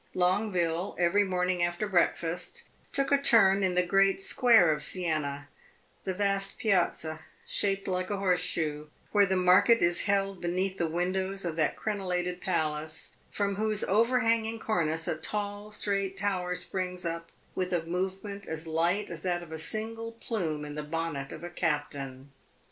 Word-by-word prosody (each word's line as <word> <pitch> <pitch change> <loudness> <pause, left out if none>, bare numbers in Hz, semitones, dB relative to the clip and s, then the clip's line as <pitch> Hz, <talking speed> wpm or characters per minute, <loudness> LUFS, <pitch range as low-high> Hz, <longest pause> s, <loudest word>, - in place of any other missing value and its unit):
Longueville, 180 -2 +1
every 180 +4 +3
morning 180 -1 0
after 175 +4 0
breakfast, 180 - 0 0.2
took 275 0 +1
a 280 0 +4
turn 200 -7 +6
in 185 -2 +1
the 180 0 +3
great 195 +2 +3
square 220 -4 +5
of 150 -1 -1
Siena 150 -4 -1 0.6
the 190 - -1
vast 195 0 0
piazza, 170 -6 0 0.3
shaped 195 -1 0
like 185 -1 -1
a 205 - -1
horse 185 -2 +2
shoe, 150 -2 -2 0.2
where 205 -1 +5
the 190 - +1
market 185 +5 +5
is 175 0 +2
held 195 -1 +1
beneath 185 +2 -1
the 170 - +1
windows 185 +3 -1
of 165 -2 -2
that 155 - +1
crenellated 180 -4 -2
palace 155 -2 -2
from 200 -1 -1
whose 215 -1 0
overhanging 230 +1 +2
cornice 165 -7 -1
a - - 0
tall, 205 +4 -2
straight 195 -2 -1
tower 185 -3 -1
springs 180 0 -3
up 165 0 -4 0.2
with 185 -1 -2
a 175 -2 0
movement 190 +3 -4
as 160 0 -4
light 170 +5 +1
as 165 -2 -6
that 175 0 -1
of 165 - -13
a 160 - -5
single 225 +6 -4
plume 170 -10 -3
in 145 - -7
the 150 - -4
bonnet 150 -2 -3
of - - -9
a 175 - -5
captain. 145 -5 -3
180 Hz, 160 wpm, -29 LUFS, 165-200 Hz, 0.6 s, turn